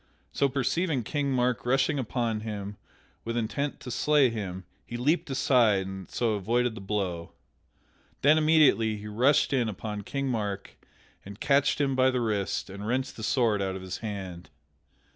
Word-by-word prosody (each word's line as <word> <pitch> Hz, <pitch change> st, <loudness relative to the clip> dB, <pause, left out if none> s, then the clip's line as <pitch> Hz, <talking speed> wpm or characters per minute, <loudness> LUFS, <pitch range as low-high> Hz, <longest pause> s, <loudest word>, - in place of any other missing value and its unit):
So 140 Hz, -, +1 dB
perceiving 140 Hz, +2 st, 0 dB
King 140 Hz, +3 st, -1 dB
Mark 125 Hz, -1 st, +1 dB
rushing 135 Hz, +4 st, +2 dB
upon 115 Hz, -3 st, -1 dB
him 105 Hz, -2 st, -5 dB, 0.5 s
with 115 Hz, +1 st, -3 dB
intent 140 Hz, +6 st, -2 dB
to 125 Hz, -, -7 dB
slay 140 Hz, 0 st, +3 dB
him 95 Hz, -4 st, -5 dB, 0.2 s
he 120 Hz, -, -6 dB
leaped 150 Hz, +6 st, +1 dB
aside 120 Hz, -7 st, +3 dB
and 95 Hz, -1 st, -7 dB
so 115 Hz, -2 st, 0 dB
avoided 115 Hz, +4 st, 0 dB
the 110 Hz, -, -9 dB
blow. 95 Hz, -4 st, -3 dB, 0.9 s
Then 155 Hz, +3 st, +6 dB
immediately 150 Hz, -9 st, +4 dB
he 105 Hz, -, -10 dB
rushed 125 Hz, +8 st, +3 dB
in 120 Hz, -4 st, +1 dB
upon 105 Hz, +1 st, -5 dB
King 140 Hz, +7 st, -3 dB
Mark 105 Hz, -5 st, -3 dB, 0.5 s
and 100 Hz, +1 st, -10 dB
catched 140 Hz, +1 st, +2 dB
him 135 Hz, -2 st, +1 dB
by 130 Hz, 0 st, +4 dB
the 130 Hz, -1 st, 0 dB
wrist 105 Hz, -4 st, -1 dB
and 100 Hz, +2 st, -7 dB
wrenched 130 Hz, +3 st, -1 dB
the -, -, -9 dB
sword 110 Hz, -2 st, +1 dB
out 95 Hz, -1 st, -2 dB
of 95 Hz, -, -7 dB
his 95 Hz, 0 st, -5 dB
hand. 95 Hz, -5 st, -6 dB
115 Hz, 165 wpm, -28 LUFS, 100-135 Hz, 0.9 s, Then